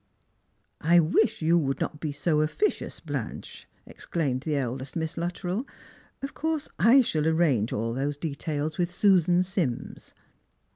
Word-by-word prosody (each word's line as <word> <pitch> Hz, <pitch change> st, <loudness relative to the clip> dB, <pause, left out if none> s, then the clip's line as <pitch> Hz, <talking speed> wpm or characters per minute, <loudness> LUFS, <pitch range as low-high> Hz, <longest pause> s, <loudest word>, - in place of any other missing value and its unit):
" -, -, -40 dB
I 170 Hz, +3 st, +5 dB
wish 170 Hz, +3 st, +2 dB
you 170 Hz, +2 st, +4 dB
would 135 Hz, -3 st, -1 dB
not 150 Hz, -, -3 dB
be 155 Hz, -2 st, -3 dB
so 150 Hz, +1 st, +1 dB
officious, 405 Hz, -, -1 dB
Blanche," -, -, -6 dB, 0.2 s
exclaimed 140 Hz, -7 st, -3 dB
the 150 Hz, +1 st, -2 dB
eldest 130 Hz, 0 st, -3 dB
Miss 160 Hz, -1 st, -2 dB
Luttrell. 175 Hz, +5 st, -2 dB, 0.3 s
" -, -, -30 dB
Of 275 Hz, -, -4 dB
course, 315 Hz, -1 st, -2 dB
I 250 Hz, +5 st, +7 dB
shall 155 Hz, -10 st, 0 dB
arrange 155 Hz, -10 st, +2 dB
all 115 Hz, +2 st, -2 dB
those 140 Hz, +3 st, -2 dB
details 150 Hz, +1 st, -3 dB
with 175 Hz, 0 st, 0 dB
Susan 180 Hz, -2 st, +4 dB
Sims." 175 Hz, -10 st, -3 dB
160 Hz, 150 wpm, -27 LUFS, 145-180 Hz, 0.3 s, I